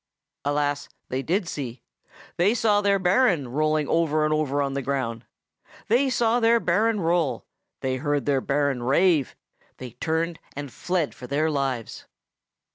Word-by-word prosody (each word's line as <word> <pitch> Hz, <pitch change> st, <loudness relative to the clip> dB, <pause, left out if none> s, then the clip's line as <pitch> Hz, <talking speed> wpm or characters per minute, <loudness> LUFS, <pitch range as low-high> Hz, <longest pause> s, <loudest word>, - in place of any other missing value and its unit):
Alas! 145 Hz, 0 st, -1 dB, 0.2 s
they 130 Hz, +1 st, -1 dB
did 180 Hz, +5 st, -1 dB
see; 125 Hz, -6 st, -6 dB, 0.5 s
they 195 Hz, +7 st, +3 dB
saw 210 Hz, -3 st, +3 dB
their 200 Hz, -1 st, +3 dB
Baron 180 Hz, -, +2 dB
rolling 155 Hz, +2 st, +1 dB
over 155 Hz, -2 st, +2 dB
and 155 Hz, -, +1 dB
over 145 Hz, -2 st, 0 dB
on 140 Hz, -1 st, 0 dB
the 140 Hz, -, -2 dB
ground. 120 Hz, -4 st, -3 dB, 0.6 s
They 255 Hz, +5 st, +3 dB
saw 235 Hz, -1 st, +2 dB
their 230 Hz, 0 st, +4 dB
Baron 215 Hz, +4 st, +1 dB
roll; 165 Hz, -3 st, 0 dB, 0.4 s
they 130 Hz, 0 st, -1 dB
heard 145 Hz, +1 st, -1 dB
their 140 Hz, -2 st, +2 dB
Baron 140 Hz, -2 st, 0 dB
rave; 145 Hz, +3 st, +2 dB, 0.4 s
they 125 Hz, -2 st, -8 dB
turned 165 Hz, +6 st, -2 dB, 0.2 s
and 145 Hz, -2 st, -6 dB
fled 175 Hz, -5 st, -1 dB
for 125 Hz, -, -10 dB
their 155 Hz, +4 st, +1 dB
lives. 135 Hz, -5 st, -3 dB
155 Hz, 150 wpm, -25 LUFS, 140-180 Hz, 0.6 s, their